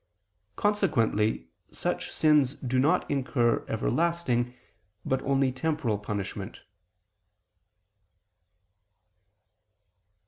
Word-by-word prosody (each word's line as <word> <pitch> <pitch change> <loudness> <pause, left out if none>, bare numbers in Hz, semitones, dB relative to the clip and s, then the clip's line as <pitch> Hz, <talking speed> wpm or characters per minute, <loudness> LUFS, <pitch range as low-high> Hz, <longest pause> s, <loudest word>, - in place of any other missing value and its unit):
Consequently 120 - +1 0.2
such - - -2
sins 150 -3 +3
do 130 0 -1
not 160 +7 +2
incur 130 -4 +1
everlasting, 125 -1 0 0.5
but 130 0 0
only 135 -1 +1
temporal 130 -5 -1
punishment. 100 -1 -5
130 Hz, 65 wpm, -28 LUFS, 115-155 Hz, 0.5 s, sins